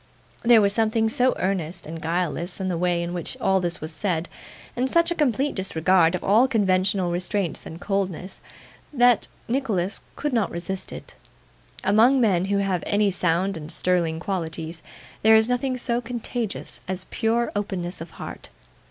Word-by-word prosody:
There 235 -2 +6
was 200 -1 +3
something 225 0 +2
so 250 +3 +2
earnest 175 -3 -2
and 160 +1 -7
guileless 175 +2 -1
in 190 -1 -2
the 175 - -1
way 175 -1 +1
in 170 +1 -4
which 175 -2 -2
all 190 0 +2
this 175 -1 -1
was 155 +1 -5
said, 175 -2 -2 0.5
and 255 +2 0
such 335 +2 +3
a - - +3
complete 285 -2 +1
disregard 180 -2 +2
of 180 - -5
all 220 +6 +4
conventional 190 -5 +1
restraints 180 +1 -2
and 165 - -9
coldnesses, 190 -2 -3 0.5
that 245 -4 +4 0.2
Nicholas 220 -7 -1
could 295 -2 -3
not 225 -5 +1
resist 185 +2 -5
it. - - -9 0.7
Among 225 +7 +5
men 190 -7 +2
who 200 +1 0
have 195 -3 0
any 205 -1 +2
sound 180 +2 0
and 155 0 -5
sterling 170 -4 +1
qualities, 165 -3 -3 0.4
there 220 +1 +6
is 220 0 +5
nothing 250 +1 -1
so 240 -1 0
contagious 240 -2 -4
as 185 0 -2
pure 230 +1 0
openness 190 -4 -3
of 165 - -7
heart. - - -8
195 Hz, 165 wpm, -24 LUFS, 175-225 Hz, 0.7 s, There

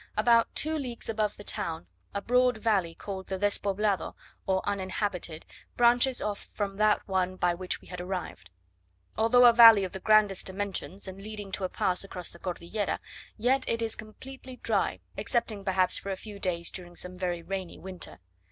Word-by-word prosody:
About 235 -1 +4
two 315 0 0
leagues 245 -5 -6
above 215 -2 -1
the 205 - -9
town 160 - -2 0.3
a 200 - -4
broad 250 -1 +3
valley 200 -7 +1
called 190 -2 -6
the 190 - -3
"Despoblado," 205 0 0 0.3
or 190 0 0
uninhabited, 190 -4 -2 0.3
branches 245 +2 +4
off 205 -1 -2
from 200 -2 -4
that 215 0 +2
one 185 -1 0
by 175 -1 +1
which 180 +1 -3
we - - -17
had 180 -1 -6
arrived. 180 0 -5 0.7
Although 235 +3 +5
a 240 - +9
valley 225 -3 +9
of 185 - -3
the 190 - -6
grandest 210 -1 +3
dimensions, 195 0 -4
and 190 +1 -8
leading 210 -1 -7
to 190 0 -2
a - - -2
pass 180 +1 0
across 180 -3 -7
the 170 - -14
Cordillera, 185 +3 -3 0.4
yet 255 +4 +2
it 230 0 0
is 225 -1 -2
completely 260 +4 -10
dry, - - 0 0.2
excepting 220 -4 -1
perhaps 185 -2 +3
for 200 - -7
a 190 - -2
few 205 -1 -10
days 170 -3 -1
during 175 -2 -9
some 180 +1 -4
very 175 -2 -2
rainy 190 -1 -5
winter. 185 -1 -6
200 Hz, 180 wpm, -29 LUFS, 185-220 Hz, 0.7 s, a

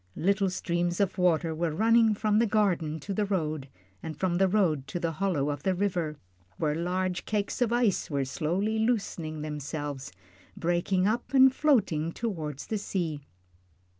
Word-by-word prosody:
Little 195 +2 +2
streams 175 -1 -1
of 195 -1 0
water 170 -2 +2
were 165 +1 -1
running 225 +2 +4
from 215 0 +2
the 230 - +3
garden 175 -8 +1
to 195 - -4
the 210 - 0
road, 155 -8 -2 0.3
and 160 -2 -6
from 180 -2 +1
the 195 - +5
road 175 -9 +1
to 155 +6 -4
the 170 -1 -1
hollow 155 -5 0
of 145 -1 -5
the 190 +2 +1
river, 175 -6 -1 0.4
where 150 -1 0
large 180 +2 -1
cakes 210 +3 -2
of 235 -2 +2
ice 240 -5 +1
were 140 -3 0
slowly 185 +11 -1
loosening 180 -9 -1
themselves, 145 - -5 0.5
breaking 175 +2 +1
up 240 +5 -1
and 265 0 +7
floating 200 - +2
toward 165 - -4
the 215 +8 -4
sea. 165 -8 -3
180 Hz, 165 wpm, -28 LUFS, 155-205 Hz, 0.5 s, and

